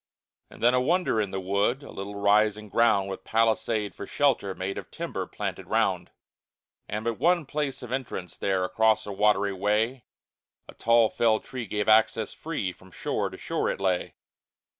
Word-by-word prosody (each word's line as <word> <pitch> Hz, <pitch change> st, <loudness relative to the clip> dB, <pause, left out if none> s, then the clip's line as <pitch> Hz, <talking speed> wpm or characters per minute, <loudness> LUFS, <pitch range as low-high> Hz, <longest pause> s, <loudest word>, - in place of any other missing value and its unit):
And -, -, -12 dB
then 120 Hz, +1 st, +5 dB
a 125 Hz, -, +3 dB
wonder 165 Hz, -5 st, +2 dB
in 100 Hz, -, -2 dB
the 95 Hz, -, -3 dB
wood, 100 Hz, +8 st, 0 dB
A -, -, -10 dB
little 100 Hz, +1 st, -6 dB
rising 105 Hz, +1 st, +2 dB
ground, 100 Hz, -3 st, +3 dB
With 95 Hz, -, -6 dB
palisade 110 Hz, -1 st, +1 dB
for 100 Hz, -, -8 dB
shelter 120 Hz, -9 st, +1 dB
made 95 Hz, +1 st, -3 dB
Of -, -, -11 dB
timber -, -, -4 dB
planted -, -, -5 dB
round. -, -, +1 dB, 0.8 s
And 105 Hz, +2 st, -3 dB
but 115 Hz, -1 st, -2 dB
one 170 Hz, +2 st, +3 dB
place 145 Hz, -2 st, -3 dB
of 125 Hz, -, -8 dB
entrance 115 Hz, -10 st, -4 dB
there 95 Hz, -2 st, 0 dB
Across 110 Hz, +4 st, +2 dB
a 105 Hz, -, -5 dB
watery 100 Hz, 0 st, +2 dB
way, 105 Hz, +6 st, 0 dB, 0.6 s
A -, -, -11 dB
tall 115 Hz, -1 st, +4 dB
felled 110 Hz, -2 st, +2 dB
tree 125 Hz, -4 st, -6 dB
gave 105 Hz, -1 st, -2 dB
access 110 Hz, 0 st, +3 dB
free, 150 Hz, -, -3 dB
From 95 Hz, +1 st, -18 dB
shore -, -, -2 dB
to -, -, -10 dB
shore -, -, -2 dB
it -, -, -3 dB
lay. 95 Hz, -2 st, -1 dB
110 Hz, 180 wpm, -27 LUFS, 100-120 Hz, 0.8 s, then